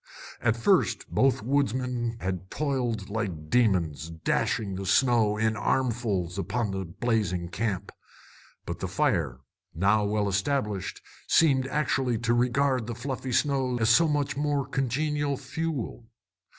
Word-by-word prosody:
At 115 0 +2
first 185 - +2
both 135 -5 +2
woodsmen 125 -2 0
had 95 0 -3
toiled 120 -9 -2
like 90 -9 -4
demons, 85 -10 +2
dashing 95 +5 -1
the 95 +1 -4
snow 110 0 +3
in 110 0 +1
armfuls 105 -5 0
upon 105 +2 -1
the 95 -1 -3
blazing 90 -2 -1
camp; 100 -1 -2 0.7
but - - -5
the - - -2
fire, 65 +1 0 0.3
now 100 +5 +3
well 105 0 0
established, 105 0 -1 0.2
seemed 135 -5 +4
actually 135 -4 0
to 115 +1 0
regard 125 0 +1
the 120 - -4
fluffy 130 +1 -4
snow 130 -1 +1
as 115 -1 +3
so 165 +8 +5
much 145 -2 0
more 145 -1 0
congenial 145 +2 -1
fuel. 140 -4 -4
115 Hz, 130 wpm, -27 LUFS, 100-135 Hz, 0.7 s, so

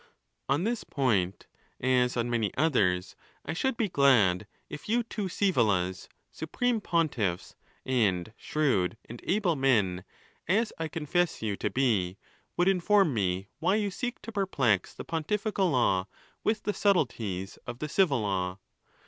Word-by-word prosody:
XXI. - - +5
On 155 - -1
this 230 +2 -1
point, 105 -10 0 0.3
as 125 -1 +2
on 120 0 0
many 115 -5 0
others, 95 - +1 0.3
I - - -3
should 265 +8 -1
be 225 - +1
glad 115 - +4 0.2
if 150 +6 -9
you 235 +2 +2
two 215 -2 -4
Sczevolas, 110 - +1 0.2
supreme 230 +8 -1
pontiffs, 125 - 0 0.3
and 110 -6 +1
shrewd 120 -11 0
and 120 +1 -10
able 185 -4 +1
men, 105 -10 +2 0.4
as 215 +6 +2
I 165 - -1
confess 165 -1 -1
you 105 -2 -1
to - - -1
be, 105 -8 +1 0.4
would 175 - +3
inform 195 -3 +3
me 95 -2 -1
why 185 +5 +2
you 210 -2 0
seek 245 +6 -4
to 230 - -7
perplex 140 - +1
the - - -9
pontifical 195 +4 0
law 100 - +2 0.4
with 215 -1 0
the 210 - -1
subtleties 115 - 0
of 120 - -5
the 150 - -4
civil, 150 - +2
law? 95 -2 -1
135 Hz, 150 wpm, -29 LUFS, -, 0.4 s, XXI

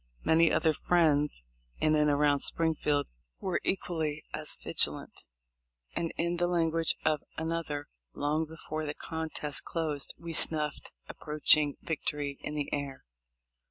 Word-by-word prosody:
Many 165 0 +5
other 160 -2 +3
friends 150 - +2 0.3
in 155 - +3
and 150 -1 +4
around 145 0 +4
Springfield 150 -2 +1 0.3
were 185 -2 -1
equally 160 -5 -1
as 155 0 -2
vigilant, - - 0 0.8
and, 165 -1 -1
in 170 +1 0
the 175 0 +2
language 165 -2 +1
of 155 -2 +3 0.2
another, 160 -3 -2 0.3
"long 150 +2 +1
before 155 0 -5
the 145 - -3
contest 160 -3 -3
closed 155 -4 -1
we 170 -1 -6
snuffed 150 -2 -1 0.2
approaching 150 -1 +2
victory 145 -3 -2
in 150 - -4
the 145 -1 -2
air." 140 -2 -3
155 Hz, 125 wpm, -31 LUFS, 145-165 Hz, 0.8 s, Many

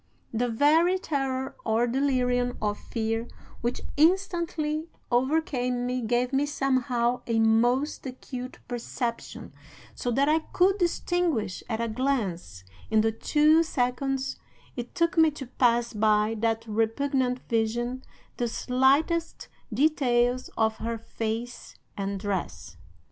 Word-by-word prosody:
"The 240 +2 0
very 315 +10 +4
terror 270 -6 -2
or 225 +2 +2
delirium 250 -1 +1
of 210 -1 -1
fear 225 0 -2 0.3
which 240 +1 -2 0.2
instantly 330 -2 +1 0.2
overcame 250 -2 +1
me 250 0 -1
gave 245 +3 0
me 280 +2 +2
somehow 255 -4 0
a 230 -1 +1
most 240 +6 +2
acute 255 0 -7
perception, 240 0 -4 0.4
so 245 - -3
that 270 +4 +2
I 310 +1 +4
could 375 +5 +1
distinguish 335 - 0
at 220 -1 -2
a 230 - 0
glance, 215 - -2 0.3
in 220 0 +4
the 225 +1 +2
two 305 +7 +4
seconds 270 -2 -1 0.4
it 245 -1 -6
took 335 0 +2
me 320 -1 +7
to 270 - -5
pass 240 -1 +1
by 215 +1 +2
that 225 0 0
repugnant 250 +4 0
vision, 240 +3 -1 0.4
the 240 - 0
slightest 275 +8 +1 0.2
details 250 -2 +2
of 220 -1 +1
her 230 0 -3
face 225 +1 -5 0.2
and 195 -1 -3
dress. 175 - -4
245 Hz, 120 wpm, -27 LUFS, 225-280 Hz, 0.4 s, me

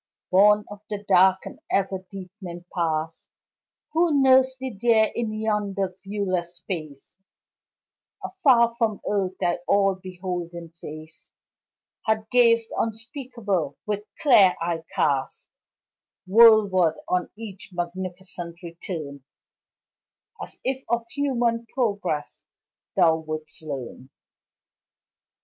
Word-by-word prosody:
Born 210 +2 +5
of 205 -1 -9
the 205 -1 -4
dark 190 +1 +5
and - - -9
ever 195 -1 +1
deepening 185 -2 -9
Past, 160 -2 -2 0.6
Who 320 -2 +3
nurs'd 260 -1 +5
thee 260 -4 -5
there 225 -2 +4
in 230 -2 -2
yonder 210 -3 -1
viewless 185 -4 -2
space 165 -3 -7 1.0
Afar 255 -11 +3
from 220 -4 0
earth 190 -2 -1
thy 175 0 0
all 195 -1 +3
beholding 180 -2 -6
face 155 +1 -10 0.8
Hath 220 0 +1
gazed 230 -2 +4
unspeakable, 225 - -3
with 210 -1 -2 0.2
clear 220 - +6
eye 170 -1 -2
cast 135 -2 0 0.8
Worldward 200 -6 +6
on 180 -1 0
each 205 -4 -9
magnificent 175 -1 -5
return 165 -5 -6 1.2
As - - -8
if 265 0 -2
of 235 0 0
human 240 -5 0
progress 200 - -2 0.5
thou 165 -4 +4
wouldst 155 -1 -6
learn. 135 -3 -7
195 Hz, 100 wpm, -24 LUFS, 175-230 Hz, 1.2 s, clear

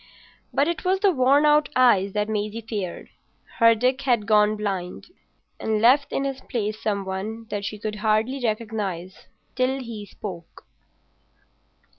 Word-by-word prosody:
But 280 - +2
it 340 -1 -2
was 375 +1 +1
the 395 -1 +4
worn 275 0 +4
out 300 0 +4
eyes 200 -7 +4
that 210 0 0
Maisie 215 +1 -3
feared. 200 -6 -5 0.5
Her 230 -1 +6
Dick 255 +4 +1
had 240 -6 +1
gone 210 -1 +4
blind 195 - -4 0.5
and 220 -1 0
left 260 +6 +4
in 275 - -1
his 270 -1 -3
place 215 -3 -3
some 200 -2 -1
one 210 +4 -5
that 205 -1 -3
she 210 - -4
could 210 0 -5
hardly 220 +5 0
recognise 210 -5 -3 0.3
till 260 +1 0
he 225 -5 -7
spoke. 180 -5 -9
220 Hz, 150 wpm, -24 LUFS, 205-255 Hz, 0.5 s, Her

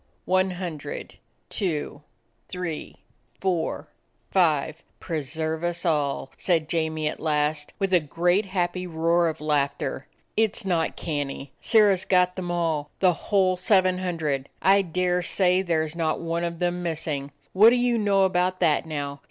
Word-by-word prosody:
"One 185 +1 +2
hundred, 180 - -6 0.3
two, 155 -7 -3 0.5
three, 180 -4 -5 0.4
four, 180 -4 -1 0.4
five. 160 -3 +2 0.2
Pre 160 -3 -3
serve 160 +3 -3
us 175 +1 -2
all!" 145 -5 0
said 165 -4 +1
Jamie 160 -1 -1
at - - -4
last, 150 -1 -1
with 195 -1 -1
a 180 - +7
great, 175 +6 +1
happy 180 -1 -1
roar 170 +1 +2
of 160 - -3
laughter. 140 -3 -1 0.3
"It 220 -1 +2
's 225 - -4
not 170 -4 0
canny. 145 -3 -4
Sirrah 210 -4 +5
's 185 - -5
got 180 -1 +3
them 180 -2 -4
all, 165 -4 -1
the 185 -2 +4 0.2
whole 190 -3 +3
seven 185 -1 +3
hun 180 -2 -2
dred! 140 -4 -2
I 195 +1 +5
dare 180 0 0
say 180 0 +2
there 165 -4 0
's 155 - -8
not 160 -2 0
one 170 0 -2
of 170 -1 -3
them 175 0 -1
missing! 155 -4 -3 0.2
What 210 +4 +8
do 240 - +3
you 245 -1 +2
know 200 -2 +3
about 185 0 +1
that 155 +1 +2
now? 145 -2 -4
170 Hz, 160 wpm, -25 LUFS, 155-185 Hz, 0.5 s, What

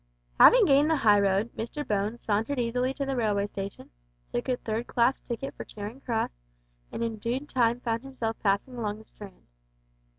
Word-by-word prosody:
Having - - +8
gained 285 -1 +4
the 320 - +4
high 210 -7 +5
road, 200 +3 +1
Mr 265 +6 -5
Bones 210 +3 -1
sauntered 220 +6 0
easily 250 +2 0
to 275 - -2
the 270 0 -2
railway 210 -4 +1
station, 195 -1 -7 0.4
took 120 - -2
a 250 - +1
third 225 +1 -3
class 245 +2 +2
ticket 245 +3 -5
for - - -7
Charing 215 +5 -8
Cross, 230 -4 -1 0.6
and 230 - -3
in 225 -1 -2
due 235 +5 -2
time 245 -4 +1
found 230 -1 -1
himself 245 -4 -4
passing 205 +5 0
along 210 -3 -2
the 220 - -14
Strand. 200 -4 -13
230 Hz, 185 wpm, -28 LUFS, 210-255 Hz, 0.6 s, Having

